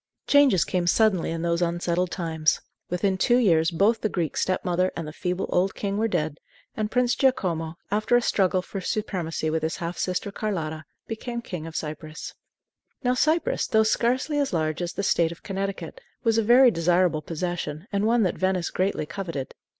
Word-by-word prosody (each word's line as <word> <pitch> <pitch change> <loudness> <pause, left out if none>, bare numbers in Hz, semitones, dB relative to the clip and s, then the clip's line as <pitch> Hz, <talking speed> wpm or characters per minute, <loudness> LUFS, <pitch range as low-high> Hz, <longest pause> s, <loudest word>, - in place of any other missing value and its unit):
Changes 280 - +5
came 180 -1 -1
suddenly 200 -3 +3
in 165 0 -3
those 170 0 0
unsettled 175 +1 0
times. 160 -4 0 0.3
Within 185 +2 0
two 240 +4 +4
years 165 -9 +4
both 200 +7 +2
the 215 - 0
Greek 170 -6 -2
step 185 +1 0
mother 180 +1 +1
and 165 - -4
the 155 - -7
feeble 180 +2 -2
old 190 +2 +1
king 200 -1 -2
were 225 - +2
dead, 155 -7 -2 0.4
and 215 -1 -1
Prince 245 +1 +2
Giacomo, 170 - 0 0.2
after 215 +3 +2
a 245 - +5
struggle 185 -4 +2
for 195 - -6
supremacy 175 -6 -2
with 160 0 0
his 160 +1 -1
half 170 +1 -5
sister 185 +2 -2
Carlotta, 160 -7 -3 0.2
became 235 +2 -5
King 170 -6 -6
of 165 - -9
Cyprus. 155 0 -6 0.7
Now 250 0 +2
Cyprus, 325 - +1
though 220 0 +4
scarcely 255 +7 +1
as 280 -7 0
large 155 -1 -1
as 175 0 -3
the 200 - -3
State 170 -4 +2
of 170 - -11
Connecticut, 195 - -4 0.2
was 225 -2 +3
a - - +2
very 245 +3 +7
desirable 175 -2 +2
possession, 165 0 -4
and 205 +1 +1
one 230 0 +3
that 180 - -1
Venice 185 -2 0
greatly 185 -4 0
coveted. 165 -5 -5
185 Hz, 185 wpm, -25 LUFS, 165-215 Hz, 0.7 s, very